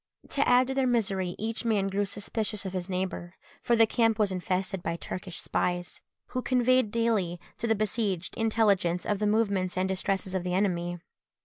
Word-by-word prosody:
To 280 - +1
add 250 +1 +6
to 265 - -3
their 265 -1 +1
misery, 195 -7 0
each 225 +2 -2
man 215 -4 +1
grew 200 +1 0
suspicious 205 +1 -3
of 190 - -4
his 185 0 -4
neighbour; 185 -1 -3 0.3
for 240 - +2
the 225 -1 +6
camp 225 -1 +2
was 210 -3 +2
infested 185 0 -1
by 170 -1 -2
Turkish 180 +1 -6
spies, 175 0 -2 0.3
who 255 - -2
conveyed 255 -2 +3
daily 210 -6 0 0.2
to 235 - -1
the 225 - +3
besieged 200 -3 -1
intelligence 205 -6 +2
of 205 -2 0
the 210 - +1
movements 200 -4 +1
and 185 +1 +1
distresses 190 0 -1
of 185 -2 -1
the 180 0 -1
enemy. 175 -3 0
200 Hz, 185 wpm, -28 LUFS, 185-225 Hz, 0.3 s, add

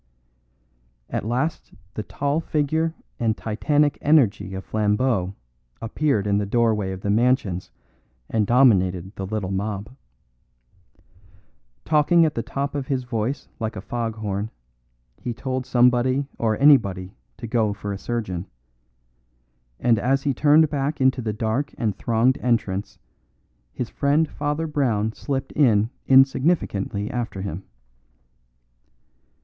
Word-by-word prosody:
At - - -2
last 130 - -2 0.2
the - - -4
tall 140 +7 -1
figure 160 +1 0 0.2
and 110 -2 0
titanic 145 +7 +1
energy 110 - +2
of 95 - -6
Flambeau 105 -2 0 0.4
appeared 115 -1 0
in 100 0 +2
the 105 - -1
doorway 110 -3 +1
of 95 0 -6
the 100 - -1
mansions 110 -5 +1 0.6
and 110 -3 0
dominated 95 -7 +3
the 95 - -5
little 100 -2 -3
mob. 100 +4 -4 1.9
Talking 165 +3 +4
at 155 - 0
the 115 - -2
top 140 +4 -3
of 140 -2 -3
his 130 -2 -1
voice 125 +2 -3
like 110 0 -3
a - - -5
fog 115 +1 -3
horn, 105 -1 -3 0.7
he 120 -2 -4
told 130 0 -3
somebody 125 +2 +3
or 110 -2 +1
anybody 100 -10 +4 0.2
to 120 - -7
go 110 -2 +1
for 100 0 -5
a - - -4
surgeon; 100 -7 -3 1.3
and 115 -3 +3
as 135 +2 +1
he 140 - +1
turned 150 +4 +5
back 145 +1 -1
into 130 -1 +2
the 110 -2 -2
dark 110 +6 -2
and 110 -5 -1
thronged 120 +3 +1
entrance 105 -5 -1 0.7
his 115 - -5
friend 145 +3 +2
Father 150 +2 -2
Brown 120 -9 0
dipped 135 +3 -4
in 115 -6 +3 0.2
insignificantly 130 - +2
after 120 -6 -4
him. 95 -1 -5
120 Hz, 130 wpm, -23 LUFS, 105-135 Hz, 1.9 s, turned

